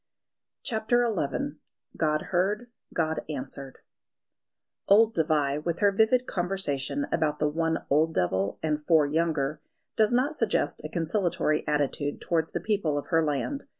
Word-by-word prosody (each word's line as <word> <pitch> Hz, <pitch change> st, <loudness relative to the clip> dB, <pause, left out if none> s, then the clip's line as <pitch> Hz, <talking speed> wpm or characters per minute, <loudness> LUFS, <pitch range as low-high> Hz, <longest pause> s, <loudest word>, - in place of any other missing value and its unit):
CHAPTER 240 Hz, +2 st, +1 dB
XI 145 Hz, -1 st, -2 dB, 0.4 s
God 155 Hz, -1 st, +1 dB
Heard: 205 Hz, +7 st, 0 dB, 0.2 s
God 160 Hz, -1 st, 0 dB
Answered 140 Hz, -2 st, -6 dB, 1.1 s
OLD 220 Hz, +3 st, +5 dB
Dévai, 150 Hz, -3 st, +1 dB
with 170 Hz, 0 st, -1 dB
her 205 Hz, -1 st, +4 dB
vivid 220 Hz, +5 st, +3 dB
conversation 180 Hz, -, -1 dB
about 150 Hz, -2 st, +1 dB
the 150 Hz, -, +1 dB
one 160 Hz, +2 st, -1 dB
old 160 Hz, +3 st, +3 dB
devil 95 Hz, +2 st, 0 dB
and 150 Hz, -1 st, -1 dB
four 160 Hz, -2 st, +4 dB
younger, 150 Hz, -1 st, 0 dB, 0.3 s
does 215 Hz, 0 st, +3 dB
not 255 Hz, +5 st, +2 dB
suggest 225 Hz, -, 0 dB
a 155 Hz, -, -5 dB
conciliatory 165 Hz, -2 st, 0 dB
attitude 145 Hz, -1 st, -1 dB
towards 165 Hz, -1 st, -1 dB
the -, -, -1 dB
people 195 Hz, -9 st, 0 dB
of 145 Hz, -, -5 dB
her 165 Hz, 0 st, +3 dB
land. 155 Hz, -, -2 dB
160 Hz, 140 wpm, -27 LUFS, 150-200 Hz, 1.1 s, OLD